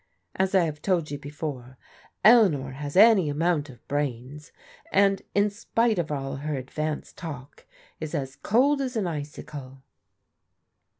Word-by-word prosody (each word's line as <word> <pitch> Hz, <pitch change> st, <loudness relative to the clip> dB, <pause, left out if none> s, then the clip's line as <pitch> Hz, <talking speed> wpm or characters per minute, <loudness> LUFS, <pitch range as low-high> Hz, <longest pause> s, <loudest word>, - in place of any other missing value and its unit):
As 190 Hz, +1 st, +1 dB
I 185 Hz, -, +5 dB
have 150 Hz, -2 st, -5 dB
told 170 Hz, -6 st, 0 dB
you 145 Hz, -, -4 dB
before, 140 Hz, -4 st, -6 dB, 0.5 s
Eleanor 185 Hz, -, +5 dB
has 145 Hz, +2 st, -6 dB
any 205 Hz, -6 st, +7 dB
amount 150 Hz, 0 st, 0 dB
of 125 Hz, -, -15 dB
brains, 145 Hz, 0 st, -4 dB, 0.4 s
and 195 Hz, -1 st, +3 dB
in 205 Hz, +1 st, +3 dB
spite 225 Hz, 0 st, 0 dB
of 155 Hz, -3 st, -2 dB
all 135 Hz, -1 st, -3 dB
her 150 Hz, +1 st, -3 dB
advanced 150 Hz, +4 st, -4 dB
talk 145 Hz, -6 st, -9 dB, 0.3 s
is 155 Hz, -1 st, -4 dB
as 135 Hz, -1 st, -3 dB
cold 275 Hz, -, +2 dB
as 260 Hz, -2 st, -3 dB
an 215 Hz, -4 st, 0 dB
icicle." 145 Hz, -4 st, -7 dB
150 Hz, 140 wpm, -26 LUFS, 140-195 Hz, 0.5 s, any